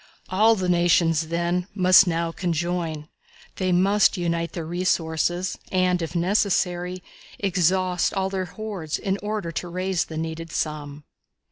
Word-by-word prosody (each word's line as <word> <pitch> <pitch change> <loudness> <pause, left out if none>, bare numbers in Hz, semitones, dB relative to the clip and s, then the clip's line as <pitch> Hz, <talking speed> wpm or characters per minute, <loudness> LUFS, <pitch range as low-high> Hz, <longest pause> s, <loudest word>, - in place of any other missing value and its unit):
All 215 +4 +4
the 185 -3 -2
nations, 170 -2 +3
then, 170 +2 -1
must 185 0 +6
now 165 -1 0
conjoin. 170 -3 -2 0.5
They 185 -1 0
must 195 +4 +3
unite 170 -1 -2
their 170 -3 -4
resources, 175 +1 -1
and, 185 -1 +2
if 165 +1 -5
necessary, 180 -1 0 0.3
exhaust 185 -1 +1
all 190 -1 -1
their 190 -1 -2
hoards, 185 -4 -5
in 195 0 -2
order 210 -4 -3
to 175 - -4
raise 185 0 -1
the 160 - -7
needed 165 0 -5
sum. 150 -2 -4
175 Hz, 135 wpm, -24 LUFS, 165-185 Hz, 0.5 s, must